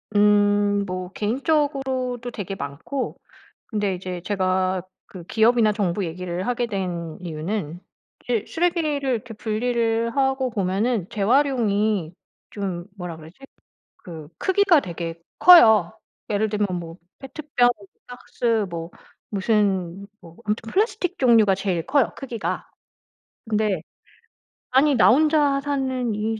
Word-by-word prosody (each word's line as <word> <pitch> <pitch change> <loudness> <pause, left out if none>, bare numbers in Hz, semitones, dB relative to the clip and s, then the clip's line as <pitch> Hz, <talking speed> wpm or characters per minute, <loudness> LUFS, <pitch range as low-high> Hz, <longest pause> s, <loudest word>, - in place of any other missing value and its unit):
음. 205 0 +3
뭐 185 -1 -5
개인적으로도 260 0 -1
되게 200 -3 -5
많고 150 - -5 0.5
근데 205 -4 -1
이제 180 -1 -6
제가 185 -1 0 0.2
그 180 -3 -11
기업이나 220 +2 +3
정부 200 -2 -1
얘기를 180 +2 -4
하게 245 -1 0
된 180 -6 -4
이유는 170 0 -4 0.4
이제 235 -4 -1
쓰레기를 335 -2 0
이렇게 240 -4 -2
분리를 230 +1 0
하고 265 -1 +1
보면은 200 0 -1
재활용이 215 - +1 0.4
좀 190 -4 -4
뭐라 180 -3 -6
그러지? 160 +2 -13 0.6
그 160 -4 -10
크기가 380 -4 +4
되게 170 -4 -6 0.2
커요. 220 - +7 0.4
예를 215 +1 +1
들면 205 -1 0
뭐 165 -1 -9 0.2
페트병, 270 -2 0 0.4
박스, 235 -3 -2
뭐 165 0 -6 0.4
무슨 200 -3 0
뭐 165 0 -15
아무튼 220 +1 -3
플라스틱 400 -3 0
종류가 225 -6 +5
제일 185 -4 -2
커요, 280 -4 +2
크기가. 240 -5 -4 0.8
근데 210 -6 0 0.9
아니 275 +2 +4
나 - - +6
혼자 290 0 +3
사는 260 -5 -1
이 220 +1 -2
210 Hz, 250 characters per minute, -23 LUFS, 185-250 Hz, 0.9 s, 커요